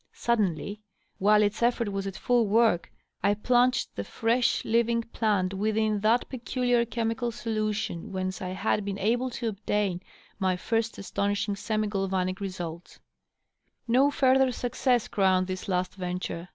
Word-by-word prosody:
Suddenly, 210 Hz, -2 st, -1 dB, 0.4 s
while 210 Hz, +2 st, +5 dB
its 205 Hz, +2 st, -1 dB
effort 235 Hz, -2 st, +2 dB
was 195 Hz, 0 st, -3 dB
at 195 Hz, -, -5 dB
Ml 240 Hz, -3 st, +2 dB
work, 220 Hz, -4 st, +2 dB, 0.3 s
I 205 Hz, +1 st, +3 dB
plunged 245 Hz, +3 st, +2 dB
the 100 Hz, -, -3 dB
fresh, 235 Hz, -, +1 dB
living 230 Hz, 0 st, +2 dB
plant 205 Hz, -5 st, 0 dB
within 215 Hz, +1 st, 0 dB
that 220 Hz, +4 st, +2 dB
peculiar 245 Hz, -1 st, 0 dB
chemical 235 Hz, 0 st, -2 dB
solution 215 Hz, -6 st, -3 dB
whence 185 Hz, -1 st, -3 dB
I 185 Hz, -, -3 dB
had 200 Hz, +3 st, 0 dB
been 200 Hz, -1 st, -3 dB
able 240 Hz, +6 st, +1 dB
to 240 Hz, -1 st, -4 dB
obtain 200 Hz, -3 st, -1 dB, 0.4 s
my 185 Hz, -2 st, +1 dB
first 225 Hz, +4 st, -1 dB
astonishing 200 Hz, +1 st, -1 dB
semi 215 Hz, +1 st, -1 dB
galvanic 190 Hz, -2 st, -1 dB
results. 175 Hz, -3 st, -6 dB, 0.9 s
No 260 Hz, +4 st, +4 dB
further 265 Hz, -2 st, +3 dB
success 245 Hz, 0 st, 0 dB
crowned 185 Hz, -2 st, +2 dB
this 185 Hz, 0 st, -5 dB
last 180 Hz, -1 st, -1 dB
venture. 180 Hz, -1 st, -4 dB
210 Hz, 140 wpm, -27 LUFS, 190-235 Hz, 0.9 s, while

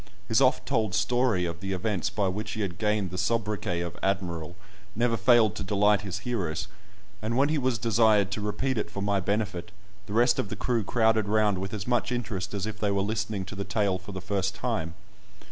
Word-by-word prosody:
His 110 Hz, +5 st, +3 dB
oft 130 Hz, +1 st, +3 dB
told 110 Hz, -7 st, 0 dB
story 120 Hz, -7 st, +2 dB
of 85 Hz, -1 st, -4 dB
the 95 Hz, +1 st, -3 dB
events 95 Hz, 0 st, -1 dB
by 100 Hz, -2 st, 0 dB
which 105 Hz, +4 st, -3 dB
he 110 Hz, -, -3 dB
had 90 Hz, -4 st, -3 dB
gained 105 Hz, -4 st, 0 dB
the 90 Hz, -, -3 dB
sobriquet 105 Hz, -6 st, -1 dB
of 85 Hz, -1 st, -4 dB
"Admiral" 90 Hz, -4 st, -2 dB, 0.4 s
never 120 Hz, 0 st, +2 dB
failed 115 Hz, -4 st, +5 dB
to -, -, -3 dB
delight 105 Hz, +1 st, +3 dB
his 95 Hz, -2 st, -4 dB
hearers, 90 Hz, -11 st, -2 dB, 0.5 s
and 115 Hz, +2 st, -1 dB
when 140 Hz, +2 st, +4 dB
he 155 Hz, -1 st, +1 dB
was 130 Hz, -3 st, +1 dB
desired 110 Hz, -2 st, +3 dB
to 105 Hz, -, -3 dB
repeat 115 Hz, +4 st, -1 dB
it 105 Hz, -, -3 dB
for 100 Hz, -1 st, -4 dB
my 100 Hz, -1 st, +2 dB
benefit, 100 Hz, -1 st, -2 dB, 0.4 s
the 100 Hz, -, -6 dB
rest 120 Hz, +2 st, +4 dB
of 100 Hz, -, -1 dB
the -, -, -4 dB
crew 120 Hz, -3 st, 0 dB
crowded 110 Hz, 0 st, +2 dB
round 105 Hz, -2 st, +2 dB
with 95 Hz, +1 st, -4 dB
as 105 Hz, -2 st, -4 dB
much 125 Hz, 0 st, 0 dB
interest 105 Hz, -6 st, -3 dB
as 100 Hz, -1 st, -2 dB
if 110 Hz, -1 st, -5 dB
they 105 Hz, -, +1 dB
were 100 Hz, -1 st, +1 dB
listening 105 Hz, -2 st, -2 dB
to 100 Hz, -, -8 dB
the 100 Hz, -, -3 dB
tale 100 Hz, -3 st, 0 dB
for 95 Hz, +2 st, -10 dB
the 95 Hz, -, -5 dB
first 95 Hz, -1 st, -1 dB
time. 90 Hz, -7 st, -2 dB
105 Hz, 215 wpm, -27 LUFS, 95-110 Hz, 0.5 s, failed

